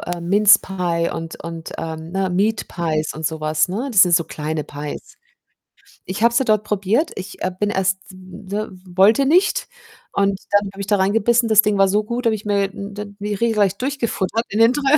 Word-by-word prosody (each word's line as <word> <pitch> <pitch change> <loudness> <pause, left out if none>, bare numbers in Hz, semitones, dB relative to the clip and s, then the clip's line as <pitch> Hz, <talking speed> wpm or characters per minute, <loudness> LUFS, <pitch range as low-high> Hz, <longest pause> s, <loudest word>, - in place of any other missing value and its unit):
äh, 175 0 -5
Mince 200 +4 +5
pie 175 -3 -2
und 165 0 -7
und, 165 -1 -7
ähm, 160 0 -6
ne 190 0 0
Meat 205 +4 0
Pies 160 -3 -2
und 160 - -8
so 160 -1 -4
was, 155 +1 +1
ne? 220 +10 -3
Das 210 -5 +6
sind 180 -2 +4
so 165 -1 +3
kleine 155 0 -4
Pies. 145 0 -8 0.9
Ich 190 +3 -5
habe 235 - +5
sie 260 +2 +2
dort 215 -2 +2
probiert. 210 - 0
Ich, 190 +2 -8
äh, 185 - -1
bin 210 - +1
erst 190 -1 0
ne, 190 +3 -7 0.2
wollte 195 +9 +4
nicht 360 +8 +2 0.5
und 200 -1 +1
dann 205 -1 +2
habe 195 - -8
ich - - -3
da 205 - +3
reingebissen. 225 +4 +2
Das 215 -1 +7
Ding 210 -1 +1
war 195 - +5
so 205 +3 +1
gut, 235 +3 -4
da - - +5
habe 220 - 0
ich 210 0 -9
mir 200 -1 +1
n 200 0 -7 0.3
die 205 +1 -3
regelrecht 205 -1 +1
durchgefuttert 235 -5 -1
in 210 - -2
den 230 +2 +6
dr 290 - -3
200 Hz, 210 wpm, -20 LUFS, 180-215 Hz, 0.9 s, Das